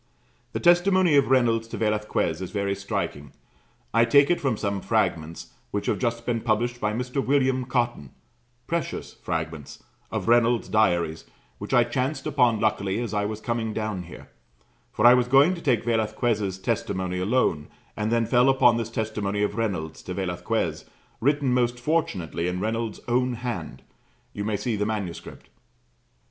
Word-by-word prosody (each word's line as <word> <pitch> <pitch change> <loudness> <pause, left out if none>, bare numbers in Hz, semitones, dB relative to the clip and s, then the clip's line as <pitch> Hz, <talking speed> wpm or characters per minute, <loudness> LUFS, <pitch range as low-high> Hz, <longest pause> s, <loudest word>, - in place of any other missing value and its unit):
The - - -2
testimony 175 -1 +4
of 140 -2 +4
Reynolds 115 -3 +2
to - - -6
Velasquez 105 -6 -1
is 95 - -4
very 100 -2 -1
striking. 75 -8 -4 0.6
I 115 +1 +5
take 140 +6 +5
it 175 - +1
from 130 -6 0
some 100 -1 -2
fragments 80 +1 -1 0.2
which 100 - -3
have - - 0
just 115 -1 -2
been 115 -2 -1
published 120 +2 0
by 105 - +1
Mr. 125 +4 -2
William 130 -2 +1
Cotton 120 - -1 0.6
precious 170 0 -3
fragments 80 -3 -5 0.3
of - - -4
Reynolds' 120 0 +3
diaries, 85 -7 +1 0.3
which - - -7
I 120 - +5
chanced 130 +5 -2
upon 125 -7 +2
luckily 100 -1 0
as 120 -3 -4
I 105 0 0
was 105 0 -4
coming 115 -1 -2
down 110 -4 -3
here: 85 -1 -11 0.6
for 110 - 0
I 120 - +10
was 125 -1 +3
going 135 +7 +5
to 170 - -7
take 125 -8 +1
Velasquez' 110 -3 0
testimony 95 -1 -2
alone, 90 -7 +1 0.3
and 105 +1 -2
then 115 -1 +2
fell 125 +2 +4
upon 120 -3 +4
this 115 -1 -3
testimony 105 -2 -2
of 105 - 0
Reynolds 100 -8 -3
to 90 - -6
Velasquez, 90 -3 -2 0.3
written 140 0 +1
most 120 -1 +1
fortunately 105 - -1
in 90 0 -2
Reynolds' 110 +1 -3
own 125 +1 +1
hand 120 0 -5 0.5
you 100 - -4
may 105 0 -1
see 110 +3 -2
the 105 0 -1
manuscript. 100 -6 -6
115 Hz, 160 wpm, -25 LUFS, 100-125 Hz, 0.6 s, I